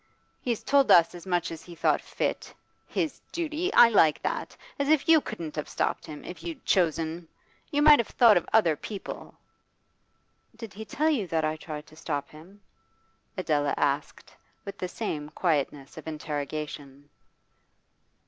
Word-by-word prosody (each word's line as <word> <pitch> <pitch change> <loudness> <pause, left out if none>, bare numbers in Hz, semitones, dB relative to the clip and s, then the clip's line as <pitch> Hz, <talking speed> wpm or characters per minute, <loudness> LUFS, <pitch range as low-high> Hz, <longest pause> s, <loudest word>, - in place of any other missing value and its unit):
'He's 235 -3 -2
told 280 -1 +3
us 170 -1 +6
as 175 +1 -11
much 175 -2 0
as 165 -1 -7
he 175 +1 -12
thought 165 - +2
fit. - - -3 0.3
His 320 -4 -2
duty! 335 +2 -2
I 240 - +8
like 160 -9 +4
that! - - -3 0.2
As 280 0 0
if 310 -2 +3
you 325 -2 +6
couldn't 170 - -6
have 150 - -4
stopped - - -2
him, 150 -1 -9
if 180 - -8
you'd 330 -5 -7
chosen! 165 -2 0 0.4
You 290 -1 +1
might 300 -1 +8
have 235 - 0
thought 230 -4 +5
of 175 - 0
other 175 -8 +4
people.' 200 +6 -8 1.2
'Did 225 -4 -9
he 220 +3 -8
tell 310 +9 +1
you 225 -11 -1
that 160 -2 0
I 155 0 -1
tried 155 -1 -8
to 155 - -18
stop 145 -3 -4
him?' 180 +7 -15 0.8
Adela 150 -5 0
asked, 140 +1 -2 0.3
with 200 - -8
the 180 - -2
same 155 -7 -4
quietness 145 -4 -1
of 160 - -12
interrogation. 145 -2 -6
170 Hz, 160 wpm, -27 LUFS, 155-230 Hz, 1.2 s, I